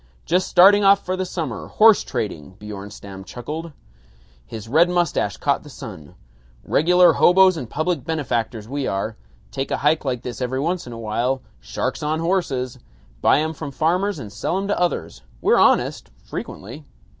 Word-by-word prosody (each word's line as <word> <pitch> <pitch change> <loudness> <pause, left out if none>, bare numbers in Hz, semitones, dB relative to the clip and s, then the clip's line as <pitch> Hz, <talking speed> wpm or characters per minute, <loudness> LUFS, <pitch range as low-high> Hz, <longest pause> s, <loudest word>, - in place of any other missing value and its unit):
"Just 180 +2 +1
starting 200 +3 +6
off 200 0 +5
for 185 - -1
the 185 0 -3
summer, 160 -10 -4
horse 220 -1 +5
trading." 95 - -5
Bjornstam 100 -2 -9
chuckled. 150 +10 -7 0.8
His 110 - -8
red 160 +8 +4
mustache 175 -3 0
caught 140 -1 0
the 150 - -13
sun. 105 - -10 0.5
"Regular 175 +2 +4
hoboes 185 +1 +5
and 130 -8 -6
public 165 +3 -1
benefactors 120 -8 -2
we 140 +1 -3
are. 100 +3 -2 0.4
Take 135 0 -3
a - - 0
hike 150 +2 +2
like 125 -4 -3
this 125 0 -6
every 130 +1 -1
once 170 +1 -2
in 120 - -7
a - - -8
while. 120 +4 -1 0.2
Sharks - - -4
on 155 +1 -1
horses. 165 -8 -1 0.4
Buy 145 - +4
'em 160 +1 -2
from 155 -1 -6
farmers 175 +7 0
and 105 -7 -8
sell 110 - -2
'em 195 +1 -2
to 205 - 0
others. 80 - -2 0.2
We're - - +3
honest - - +2
frequently. - - -8
145 Hz, 165 wpm, -22 LUFS, 115-175 Hz, 0.8 s, starting